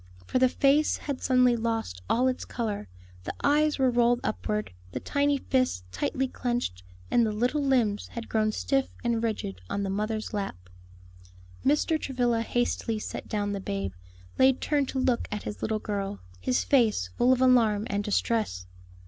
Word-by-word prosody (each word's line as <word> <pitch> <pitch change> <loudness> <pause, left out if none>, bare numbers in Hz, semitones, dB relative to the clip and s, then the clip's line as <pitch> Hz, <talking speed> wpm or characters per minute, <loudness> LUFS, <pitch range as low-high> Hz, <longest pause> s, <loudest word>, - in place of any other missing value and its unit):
For 255 - 0
the 255 0 +5
face 285 +4 +3
had 280 -3 -5
suddenly 250 -2 +4
lost 225 - -2
all 250 +2 +3
its 255 0 -1
color; 215 - -3 0.4
the - - -5
eyes 300 +1 +3
were 260 -2 +3
rolled 240 0 +3
upward, 95 +1 -2 0.2
the - - -2
tiny 285 0 +1
fists 255 - 0
tightly 260 - -1
clenched, 240 - -2 0.3
and 240 - +4
the 220 - +1
little 245 +8 0
limbs 240 -7 +1
had 235 -1 -7
grown 215 -1 +1
stiff 270 +4 0
and 235 -1 +1
rigid 205 - -3
on 200 - -1
the 195 - -2
mother's 215 +2 -2
lap. 95 - -4 0.9
Mr. 300 +3 +2
Travilla 245 -3 0
hastily 235 -1 -1
set 215 - -6
down 205 -1 -1
the 200 - -2
babe, 100 - -3 0.5
laid 260 0 +5
turned 285 -3 0
to - - -3
look 250 -2 +1
at 210 -1 -3
his 210 - -6
little 220 0 0
girl, 200 - -3 0.2
his 125 +8 +1
face 220 - +2
full 250 - +4
of 260 - +3
alarm 230 -5 +4
and 205 -4 -1
distress. 205 - 0
230 Hz, 170 wpm, -28 LUFS, 205-255 Hz, 0.9 s, the